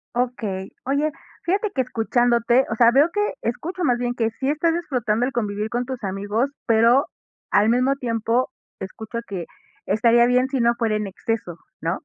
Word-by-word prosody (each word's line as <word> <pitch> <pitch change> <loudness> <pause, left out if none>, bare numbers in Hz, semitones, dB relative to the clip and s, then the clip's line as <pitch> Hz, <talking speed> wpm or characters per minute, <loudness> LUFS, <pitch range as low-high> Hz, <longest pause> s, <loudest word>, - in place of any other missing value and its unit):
Okey. 215 -6 -2 0.2
Oye, 280 +4 +1 0.3
fíjate 400 +4 0
que 265 - 0
escuchándote, 240 +1 +2
o 220 - 0
sea, 235 0 +6
veo 285 +5 +5
que, 415 +2 0
escucho 340 +10 -3
más 245 -7 +2
bien, 245 0 -1
que 225 -2 0
sí 270 +1 0
estás 325 +2 +1
disfrutando 245 -9 0
el 270 - -2
convivir 210 -2 -2
con 240 +1 -2
tus 255 -5 -6
amigos, 205 +7 -1 0.2
pero, 230 +4 +4 0.4
al 210 +2 +4
mismo 255 +3 +2
tiempo, 235 0 0 0.3
te - - -5
escucho 220 +4 -6
que 180 -4 -5 0.4
estaría 230 +4 +4
bien 250 +1 +3
si 265 -2 -1
no 235 0 +3
fuera 225 -3 0
en 210 -1 -2
exceso, 195 -3 -4 0.2
¿no? 165 +3 -2
240 Hz, 180 wpm, -22 LUFS, 220-260 Hz, 0.4 s, sea